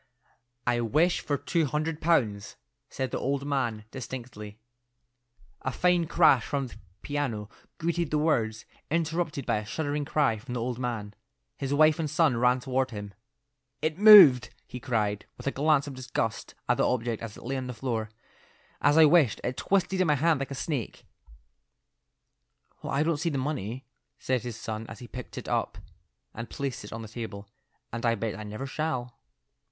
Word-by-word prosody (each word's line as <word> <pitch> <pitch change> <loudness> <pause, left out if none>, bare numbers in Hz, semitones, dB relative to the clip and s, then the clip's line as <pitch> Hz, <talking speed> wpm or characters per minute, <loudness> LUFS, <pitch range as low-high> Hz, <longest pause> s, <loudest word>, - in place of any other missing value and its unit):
"I 120 -1 +2
wish 155 +10 +2
for 145 - -1
two 155 +3 0
hundred 150 +2 -2
pounds," 115 -12 +1 0.3
said 130 -1 -3
the - - -2
old 140 +1 -1
man 120 -7 -1
distinctly. 120 -5 -7 1.0
A 130 - -2
fine 175 +3 +2
crash 155 -8 +5
from 140 -1 -2
the 125 - -10 0.3
piano 125 -8 -3 0.3
greeted 170 -1 -1
the 150 - +1
words, 115 -8 0 0.2
interrupted 160 -3 -1
by - - +1
a 105 - -3
shuddering 145 +1 -2
cry 140 -8 +1
from 125 +3 -7
the - - -1
old 120 +1 -3
man. 115 -5 -3 0.4
His 135 -1 -4
wife 155 +2 +4
and 155 -2 -1
son 145 -6 +2
ran 125 +1 +3
toward 130 +1 -1
him. 105 -3 -7 0.7
"It 155 +3 -2
moved," 195 - +9 0.2
he 125 - -8
cried, 105 -5 -1
with - - -11
a 140 - +1
glance 145 0 +2
of 145 - -6
disgust 125 -4 -3
at - - +2
the - - +3
object 120 -2 -1
as 115 -2 -7
it - - -12
lay 135 +3 -3
on 130 -1 -3
the - - -4
floor. 115 -2 -2 0.7
"As 145 +2 +4
I 160 - +9
wished, 150 - +4
it 125 - -2
twisted 190 -1 +1
in 185 - +3
my 150 - +4
hand 155 +1 +2
like 135 - -3
a 140 - -5
snake." 135 -3 -4 1.8
"Well, - - -5
I 140 +2 +2
don't 165 -1 +1
see 165 - -1
the 145 - -2
money," 130 -3 -3 0.3
said 130 -2 -1
his 120 -3 -6
son 110 0 -5
as 115 - -8
he 125 - -10
picked 125 +1 -9
it - - -6
up - - -1 0.6
and 115 +1 -7
placed 140 -6 -4
it 105 - -10
on 115 0 -6
the - - -8
table, 105 -2 -7 0.5
"and 115 - -4
I 115 -1 +3
bet 115 0 -3
I - - -7
never 105 +5 -6
shall." 135 -4 -3
130 Hz, 185 wpm, -28 LUFS, 115-150 Hz, 1.8 s, moved